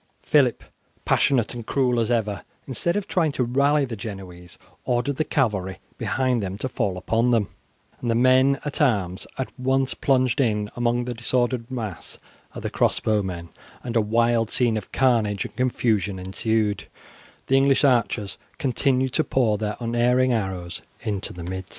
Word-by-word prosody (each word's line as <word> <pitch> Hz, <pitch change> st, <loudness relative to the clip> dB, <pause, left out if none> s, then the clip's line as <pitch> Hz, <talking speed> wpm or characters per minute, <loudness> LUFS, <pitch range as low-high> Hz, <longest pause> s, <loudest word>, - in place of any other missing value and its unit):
Phillip, 135 Hz, -6 st, +3 dB, 0.4 s
passionate 125 Hz, -5 st, +2 dB
and 120 Hz, -1 st, -6 dB
cruel 125 Hz, -3 st, +1 dB
as 115 Hz, -1 st, 0 dB
ever, 110 Hz, -4 st, 0 dB, 0.2 s
instead 160 Hz, +6 st, -1 dB
of 205 Hz, -2 st, -2 dB
trying 165 Hz, -4 st, +1 dB
to 130 Hz, -, 0 dB
rally 140 Hz, +4 st, +2 dB
the 120 Hz, -3 st, -5 dB
Genoese, 95 Hz, -5 st, -9 dB, 0.3 s
ordered 125 Hz, +3 st, 0 dB
the -, -, +2 dB
cavalry 105 Hz, -, 0 dB, 0.2 s
behind 130 Hz, -2 st, 0 dB
them 95 Hz, 0 st, -4 dB
to 130 Hz, -, -3 dB
fall 100 Hz, -7 st, -2 dB
upon 115 Hz, +6 st, +1 dB
them, 115 Hz, -5 st, +2 dB, 0.5 s
and 120 Hz, -, -3 dB
the 115 Hz, -, +2 dB
men 130 Hz, +3 st, +4 dB
at 145 Hz, -, -2 dB
arms 100 Hz, -9 st, +1 dB
at 130 Hz, -, -3 dB
once 130 Hz, +1 st, +1 dB
plunged 130 Hz, 0 st, +2 dB
in 105 Hz, -4 st, 0 dB
among 120 Hz, 0 st, 0 dB
the 125 Hz, -, -3 dB
disordered 120 Hz, 0 st, -1 dB
mass 110 Hz, -8 st, -6 dB, 0.4 s
of -, -, -7 dB
the -, -, -2 dB
crossbow 105 Hz, -1 st, +1 dB
men, 85 Hz, -3 st, -5 dB, 0.3 s
and 120 Hz, -2 st, -5 dB
a 115 Hz, -, +5 dB
wild 115 Hz, +1 st, +2 dB
scene 120 Hz, -3 st, +2 dB
of 105 Hz, -3 st, -5 dB
carnage 115 Hz, -6 st, +2 dB
and -, -, -9 dB
confusion 110 Hz, -6 st, 0 dB
ensued, 105 Hz, +3 st, -1 dB, 0.6 s
the 135 Hz, -, +2 dB
English 135 Hz, 0 st, +4 dB
archers 115 Hz, -7 st, +1 dB, 0.2 s
continuing 130 Hz, 0 st, +1 dB
to -, -, +2 dB
pour 110 Hz, -6 st, +1 dB
their 105 Hz, -1 st, -2 dB
unerring 120 Hz, +2 st, +2 dB
arrows 95 Hz, -5 st, -3 dB, 0.2 s
into 100 Hz, -3 st, -3 dB
the 90 Hz, -, -8 dB
midst. 95 Hz, +2 st, -5 dB
120 Hz, 165 wpm, -24 LUFS, 105-130 Hz, 0.6 s, a